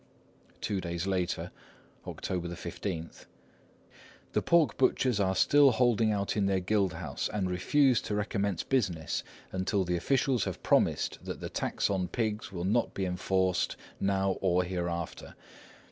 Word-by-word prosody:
Two 100 -3 -1
days 85 0 -3
later, 95 -2 -1 0.6
October 90 -2 -3
15:— 85 0 -6 1.1
"The - - +2
pork 170 -3 +3
butchers 130 -3 +2
are 95 -1 +2
still 145 +8 +6
holding 115 -3 +3
out 100 -1 -1
in 100 -2 +2
their 95 -1 +2
guild 95 0 +1
house, - - -4
and 100 -3 -1
refuse 130 +7 +3
to 105 - -3
recommence 100 -3 -1
business 95 - -1 0.3
until 95 +1 0
the 90 -1 0
officials 130 - +1
have - - -5
promised - - +2
that - - -5
the - - -5
tax - - -1
on 95 -2 0
pigs 110 +1 -2
will 90 -2 -4
not 110 +5 +1
be 95 - -1
enforced 95 0 0 0.2
now 95 -1 +1
or 90 -1 +3
hereafter. 85 -2 -4
95 Hz, 145 wpm, -30 LUFS, 90-110 Hz, 1.1 s, still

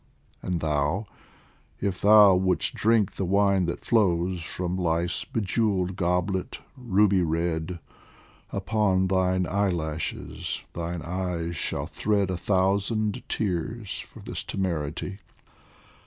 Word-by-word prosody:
And 90 -2 -2
thou, 75 +6 0 0.7
if 95 -2 -2
thou 105 -1 +8
would'st 90 0 +1
drink 110 -3 +2
the - - -4
wine 100 -1 +3
that 85 - -4
flows 90 -5 +2
From 90 +2 -3
Life's 85 -1 0
bejewelled 100 -3 0
goblet, 90 +4 -1 0.2
ruby 105 -6 +3
red, 85 +1 -1 0.7
Upon 100 -2 +1
thine 95 -1 +2
eyelashes 85 -6 -2
thine 85 0 -4
eyes 85 -1 -3
shall 75 - -2
thread 100 -3 0
A 90 - -2
thousand 100 +3 +1
tears 105 +2 -2
for - - -11
this - - -5
temerity. 90 +1 -3
95 Hz, 110 wpm, -26 LUFS, 85-100 Hz, 0.7 s, thou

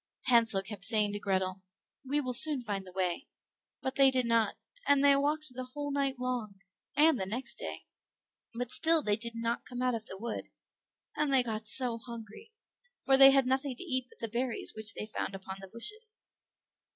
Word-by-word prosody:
Hansel 225 -5 +4
kept 200 -1 -8
saying 210 -1 +1
to 205 - -4
Grethel, 190 -1 -3 0.4
"We 285 +2 -2
will 255 -2 -4
soon 270 +1 +10
find 200 -4 -5
the - - -11
way"; 180 -2 -3 0.6
but 265 - -3
they 275 -1 +6
did 255 -2 0
not, 230 -1 0 0.3
and 285 -1 +3
they 280 -1 +7
walked 295 0 -2
the 255 +1 -6
whole 290 0 -5
night 275 -1 -2
long 250 -5 -5 0.4
and 305 -2 +4
the 190 - -3
next 240 +7 -4
day, - - -7 0.7
but 245 +1 -6
still 325 -1 +3
they 205 -1 +1
did 230 +1 -4
not 230 +1 -3
come 250 0 -7
out 250 -1 0
of 225 -1 -6
the 190 - -9
wood; 230 +3 -7 0.7
and 300 -2 -1
they 265 -2 +4
got 220 -2 -6
so 240 0 -1
hungry, 235 - -12 0.5
for 270 - +4
they 270 0 +9
had 270 -1 +3
nothing 265 +1 -2
to - - -9
eat 260 -7 -4
but - - -22
the 230 - -5
berries 240 +2 -4
which 220 -1 -2
they - - -6
found 210 -2 -6
upon 190 0 -9
the 195 - -11
bushes. 430 - -7
245 Hz, 200 wpm, -29 LUFS, 215-270 Hz, 0.7 s, soon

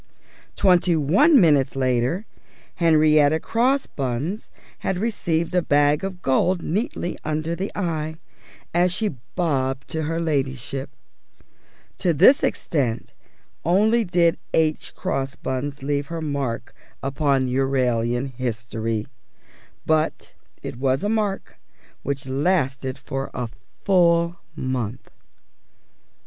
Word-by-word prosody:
Twenty 180 -3 +4
one 225 - +5
minutes 145 - +4
later 130 - 0 0.5
Henrietta 155 -2 +4
Crossbuns 200 - -1 0.3
had 190 - -1
received 175 -6 -1
a 180 - +3
bag 145 0 +3
of 190 -2 -5
gold 175 +7 +2
neatly 180 -1 -2
under 155 +2 -2
the 190 +3 -4
eye, 160 -5 -2 0.6
as 175 +1 +3
she 210 +4 -1 0.3
bobbed 135 -6 0
to 160 - -2
her 165 +2 -2
Ladyship. 135 -4 -2 1.1
To 175 - +2
this 260 - +6
extent 125 -7 -1 0.5
only 215 +7 +3
did 175 -3 +2 0.2
H. 155 -1 0
Crossbuns 135 +1 -3
leave 145 0 -1
her 165 0 -4
mark 140 -6 -3 0.3
upon 135 -1 +1
Euralian 125 -1 0
history; 115 -2 -3 0.8
but 155 0 0 0.3
it - - -6
was 135 0 +1
a 205 - 0
mark 210 -3 -2 0.4
which 140 -1 -3
lasted 135 -2 0
for 135 0 -4
a 125 -2 -3 0.3
full 170 -2 +3 0.2
month. 130 -2 -4
150 Hz, 105 wpm, -23 LUFS, 135-175 Hz, 1.1 s, this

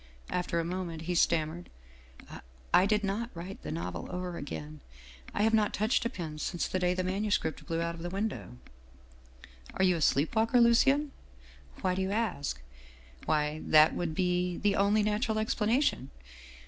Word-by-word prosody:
After 180 -1 -1
a 165 - -1
moment 170 -2 -4
he 180 +2 -2
stammered: 170 0 +1 0.4
" 65 +1 -13
' 65 0 -26
I 185 - +6
did 210 0 +1
not 205 +4 -2
write 180 +4 -8
the - - -6
novel 85 +2 -4
over 180 -1 -4
again. 150 0 -7 0.5
I 205 - 0
have 225 +1 +3
not 215 -2 +2
touched 215 +4 +1
a - - +1
pen 160 -9 -6
since 175 +2 -2
the 185 - -1
day 180 0 +1
the 185 - -1
manuscript 195 -3 -1
blew 165 0 -1
out 170 0 -1
of 170 - -9
the 175 - -4
window.' 195 - -4 0.4
" 65 0 -26
' 65 0 -18
Are 190 - +1
you 180 -1 +4
a 165 - -3
sleep 145 +6 +2
walker, 225 +3 +3
Lucien? 270 +5 +4 0.3
' 65 0 -21
"'Why 185 - +2
do 190 - -1
you 190 - -1
ask?' 190 - -2 0.2
" 65 0 -22
' 60 0 -20
Why, 150 0 0
that 155 0 +6
would 165 -3 -3
be 180 0 0
the 205 -1 +1
only 205 +2 +3
natural 215 +1 0
explanation. 220 - +1
180 Hz, 195 wpm, -30 LUFS, 150-210 Hz, 0.5 s, I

